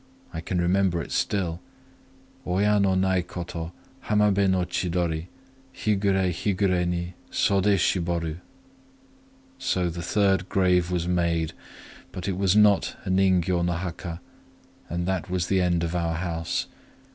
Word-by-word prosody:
I 80 - -4
can 90 +1 -2
remember 90 0 +2
it 85 - -6
still:— 90 -4 -1 0.9
Oya 100 +3 +2
no 95 -1 +3
nai 95 -1 +2
ko 90 0 -6
to 85 -1 -6 0.3
Hamabé 105 -2 +3
no 95 -1 +2
chidori: 85 -2 -1 0.5
Higuré 100 -4 +1
higuré 90 0 0
ni 85 0 -2 0.2
Sodé 100 +1 +3
shiboru. 85 -3 0 1.2
"So 90 -2 0
the 85 +1 -6
third 95 0 +1
grave 90 -2 +2
was 90 -1 -1
made,—but 85 +1 -3
it 95 - -1
was 95 0 +2
not 105 -2 +4
a 95 - -1
ningyô 95 -2 +2
no 85 0 +1
haka;—and 95 +4 -7
that 95 -1 -2
was 90 -1 0
the 95 +1 +2
end 85 -2 +1
of 85 +1 -2
our 85 -1 0
house. 85 -1 -2
90 Hz, 135 wpm, -25 LUFS, 85-95 Hz, 1.2 s, not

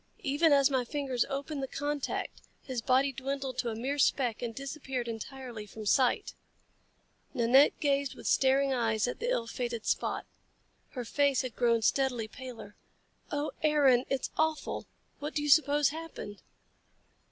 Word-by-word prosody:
Even 295 +4 +3
as 280 0 +5
my 260 -2 +2
fingers 265 -2 -1
opened 280 +1 -3
the 270 - -2
contact, 290 +1 -3 0.2
his 255 -3 -4
body 265 +3 +3
dwindled 270 -1 -4
to 240 - 0
a 220 - -4
mere 270 +6 -2
speck 250 -5 +2
and 235 -2 -4
disappeared 270 -2 -4
entirely 230 -1 -7
from 215 +1 -9
sight." 250 +4 +2 1.0
Nanette 250 +4 +5
gazed 280 -2 0
with - - -12
staring 270 +1 +3
eyes 225 -2 +1
at 245 - -4
the 475 +2 -1
ill 235 - 0
fated 235 -1 -4
spot. - - -1 0.7
Her 250 -3 -4
face 280 +2 +2
had 255 -3 -5
grown 235 -2 +2
steadily 250 -3 +1
paler. 240 -3 -10 0.6
"Oh, 290 +1 -1
Aaron! 280 -5 +4
It's 270 -2 -1
awful! 315 0 -1 0.3
What 295 +1 -5
do 295 - 0
you 295 - -1
suppose 290 0 +5
happened?" 310 -9 -8
265 Hz, 155 wpm, -30 LUFS, 240-285 Hz, 1.0 s, as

